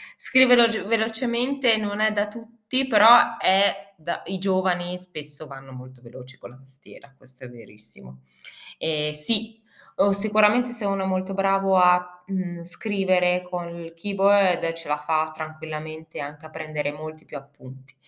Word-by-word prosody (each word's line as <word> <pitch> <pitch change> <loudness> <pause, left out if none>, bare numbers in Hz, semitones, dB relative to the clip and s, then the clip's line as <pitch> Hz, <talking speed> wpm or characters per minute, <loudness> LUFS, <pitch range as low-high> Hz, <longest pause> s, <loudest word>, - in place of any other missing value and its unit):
scrivere 255 -2 +5
veloge 220 -3 -3
velocemente 235 +3 0
non 210 -1 -4
è 215 0 +2
da 205 0 -1
tutti, 230 +3 -5
però 230 +1 +7
è 195 +1 +1
da 160 +2 -5
i 190 0 -4
giovani 185 -2 -1
spesso 155 -4 -11
vanno 135 -1 -12
molto 130 0 -13
veloci 125 +2 -14
con - - -13
la 130 - -17
tastiera, 135 +1 -19
questo 130 0 -18
è 125 - -10
verissimo. 105 - -15 0.6
Eh 150 -1 -2
sì, 220 +8 -1 0.3
o 200 +1 +3
sicuramente 215 +4 +2
se 235 -3 -6
uno 195 -1 -1
è - - -2
molto 185 +1 -2
bravo 195 0 +1
a, 180 0 +2
mhmm, 180 -3 -5
scrivere 180 -1 0
con 175 -1 -5
il 170 -1 -10
keyboard 195 -1 +2
ce 165 -2 -11
la 150 - -1
fa 155 +1 -1
tranquillamente 155 0 -8
anche 145 +2 -9
a - - -11
prendere 155 -2 -5
molti 155 +1 -10
più - - -13
appunti. 135 -2 -14
180 Hz, 155 wpm, -23 LUFS, 150-205 Hz, 0.6 s, però